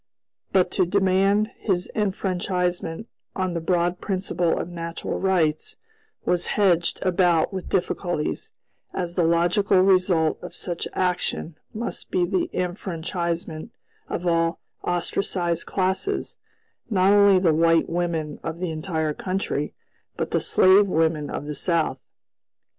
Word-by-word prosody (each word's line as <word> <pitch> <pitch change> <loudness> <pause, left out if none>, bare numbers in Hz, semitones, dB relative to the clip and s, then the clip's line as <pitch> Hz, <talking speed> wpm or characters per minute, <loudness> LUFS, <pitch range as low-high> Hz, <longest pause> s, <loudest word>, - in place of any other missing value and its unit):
But 185 -2 +3
to 185 - +2
demand 195 +3 +2
his 180 -4 0
enfranchisement 180 -2 -1 0.3
on 185 -2 -1
the 170 - -2
broad 175 +1 0
principle 185 -3 0
of - - -3
natural 170 -1 -4
rights 170 -5 +1 0.5
was 175 -1 +1
hedged 175 -5 +3
about 175 -2 +2
with 190 -1 -5
difficulties, 175 -3 -1 0.5
as 175 -2 -2
the 175 - +1
logical 175 +4 +3
result 185 -4 +3
of 180 - -8
such 175 -2 -3
action 180 -3 -1 0.2
must 230 +2 -5
be 180 - +2
the 185 0 0
enfranchisement 170 -1 -3 0.4
of 175 - -3
all 165 -1 +1 0.2
ostracized 175 -1 -1
classes; 190 - -1 0.5
not 195 -2 +4
only 200 -1 +6
the 180 -4 +3
white 165 +1 +3
women 165 -3 -2
of 165 0 -4
the 175 -1 -3
entire 160 -1 -2
country, 185 -5 -3 0.4
but - - -2
the - - +2
slave 195 +2 +5
women 160 -4 +1
of 145 - -4
the 150 - -4
South. 160 -5 0
175 Hz, 125 wpm, -24 LUFS, 165-190 Hz, 0.5 s, only